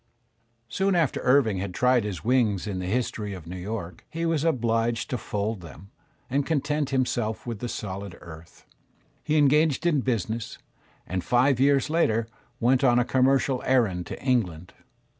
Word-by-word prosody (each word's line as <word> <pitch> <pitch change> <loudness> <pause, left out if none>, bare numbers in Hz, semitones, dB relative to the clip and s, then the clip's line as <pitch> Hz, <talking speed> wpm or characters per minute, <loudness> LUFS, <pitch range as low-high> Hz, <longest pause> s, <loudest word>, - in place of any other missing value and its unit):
Soon 190 - 0
after 165 -6 +1
Irving 125 -7 +3
had 95 -1 -5
tried 125 -3 +3
his 100 -4 -5
wings 115 -6 +2
in 100 -3 -3
the 90 - -4
'"History 105 -2 -2
of 90 -4 -10
New 90 +2 -7
York," 90 -2 -6
he 165 +1 -3
was 165 -3 +1
obliged 115 -6 0
to 125 - 0
fold 105 0 -3
them 85 +3 -12 0.4
and 140 +3 0
content 150 -1 -1
him 130 -2 +2
self 110 -3 -3
with 115 -4 -5
the 120 - -4
solid 100 -3 -6
earth. 80 -1 -13 0.6
He 155 0 +1
engaged 150 +1 +3
in 155 -5 +3
business, 115 -1 -2 0.5
and 90 0 -3
five 125 +1 +3
years 140 0 +3
later 115 -9 +1 0.3
went 125 +3 +3
on 120 -2 +4
a 125 - +3
commercial 130 0 +2
errand 110 -9 +1
to - - -7
England. 90 - -1
120 Hz, 165 wpm, -26 LUFS, 100-135 Hz, 0.6 s, on